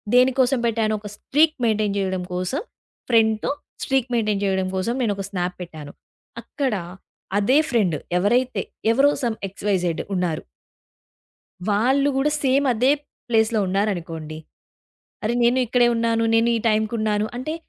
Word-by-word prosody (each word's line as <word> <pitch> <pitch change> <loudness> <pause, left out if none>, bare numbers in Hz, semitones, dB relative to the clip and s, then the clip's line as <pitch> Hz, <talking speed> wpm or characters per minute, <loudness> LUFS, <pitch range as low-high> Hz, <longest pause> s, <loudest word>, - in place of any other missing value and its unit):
దేనికోసం 255 +1 +4
పెట్టాను 220 -1 0
ఒక 210 - -9
స్ట్రీక్ 310 +2 +2
మెయింటైన్ 215 -2 +1
జేయడం 190 -2 -1
కోసం 185 - -2 0.5
ఫ్రెండ్‍తో 220 -1 +3 0.3
స్ట్రీక్ 265 -2 0
మెయింటైన్ 210 -3 0
జేయడం 190 -1 0
కోసం 190 +6 -1
నేనొక 200 -3 -1
స్నాప్ 180 -1 -2
పెట్టాను. 155 -4 -10 0.5
అక్కడ 270 -6 -2 0.7
అదే 250 +7 +3
ఫ్రెండ్ 195 -10 +2 0.2
ఎవరైతే 245 +7 +1 0.3
ఎవరో 280 +4 +4
సమ్ 230 -2 -1
ఎక్స్, 195 +1 -13
వై, 200 - +3
జెడ్ 170 -2 -1
ఉన్నారు. 180 -4 -1 1.3
వాళ్ళు 260 +7 +2
గూడ 270 +2 +2 0.2
సేమ్ 270 +2 +3
అదే 250 +5 +3 0.4
ప్లేస్‍లో 225 -1 +2
ఉన్నారనుకోండి. 170 -6 -2 0.9
అరే! 220 - 0
నేను 245 +2 +3
ఇక్కడే 245 0 +3
ఉన్నాను. 230 0 +1
నేను 230 +1 +3
ఈ - - -3
టైమ్‍కున్నాను. 215 -1 0
అంటే 310 +6 -3
220 Hz, 130 wpm, -22 LUFS, 195-250 Hz, 1.3 s, దేనికోసం